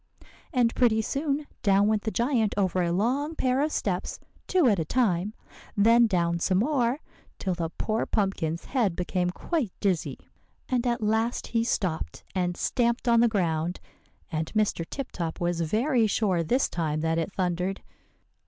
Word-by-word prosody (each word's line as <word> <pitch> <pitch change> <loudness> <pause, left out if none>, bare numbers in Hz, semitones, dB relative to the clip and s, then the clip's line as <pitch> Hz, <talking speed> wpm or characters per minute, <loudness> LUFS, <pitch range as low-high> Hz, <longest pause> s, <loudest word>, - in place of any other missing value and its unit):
"And 245 -5 +2
pretty 220 -3 +3
soon, 285 +3 -1 0.2
down 200 -1 +4
went 215 -1 +2
the 220 - -2
giant 230 -2 +1
over 185 -2 +1
a 170 -1 0
long 260 - 0
pair 260 -1 +1
of 305 +1 0
steps, 185 -9 -2 0.3
two 365 -5 +3
at 205 -6 +3
a - - +1
time, 200 0 0 0.4
then 230 +3 +6
down 170 -4 +1
some 185 +2 +1
more, 255 +3 +1 0.4
till 190 - -1
the 170 -2 -3
poor 220 +1 -1
pumpkin's 180 -6 -1
head 225 -10 0
became 180 0 -1
quite 255 - -2
dizzy. 185 -5 0 0.5
And 250 -1 0
at 240 -1 0
last 220 +3 0
he 230 -1 0
stopped, 185 -8 -2
and 180 -2 -1
stamped 235 0 0
on 235 -1 +5
the 240 - +5
ground; 175 -5 -1 0.5
and 160 0 -2
Mr. 215 -5 +1
Tip 275 -2 -5
Top 165 -2 -4
was 175 -1 0
very 225 - +2
sure 195 -4 +1
this 245 - +1
time 155 -3 -2
that 165 +1 +1
it 165 +4 -2
thundered. 180 +1 -1
210 Hz, 165 wpm, -27 LUFS, 175-240 Hz, 0.5 s, then